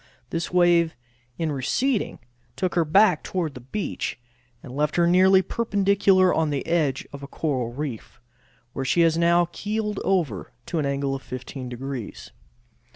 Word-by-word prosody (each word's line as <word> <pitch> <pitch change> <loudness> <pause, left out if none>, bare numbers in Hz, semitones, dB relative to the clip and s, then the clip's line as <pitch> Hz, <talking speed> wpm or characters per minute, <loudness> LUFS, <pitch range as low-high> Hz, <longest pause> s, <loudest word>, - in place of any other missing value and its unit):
This 165 0 -2
wave 175 -2 +3 0.4
in 160 -2 -1
receding 205 - 0 0.4
took 185 +4 -1
her 170 - +3
back 180 +1 +4
toward 170 -6 -3
the 125 - -9
beach, 135 - -4 0.4
and 130 -1 -9
left 150 +1 0
her 175 - +4
nearly 185 +2 +5
perpendicular 200 -4 +2
on 160 -1 +1
the 145 -2 -2
edge 155 -6 0
of 140 - -8
a 140 - -7
coral 130 -6 -2
reef, 125 -2 -6 0.5
where 135 - -3
she 155 +6 +2
has 165 -1 +4
now 170 +1 +4
keeled 210 0 -3
over 155 - -1
to 170 - -2
an 145 - 0
angle 140 0 -1
of 135 - -4
15 130 0 -7
degrees. 125 -2 -6
165 Hz, 160 wpm, -24 LUFS, 135-185 Hz, 0.5 s, nearly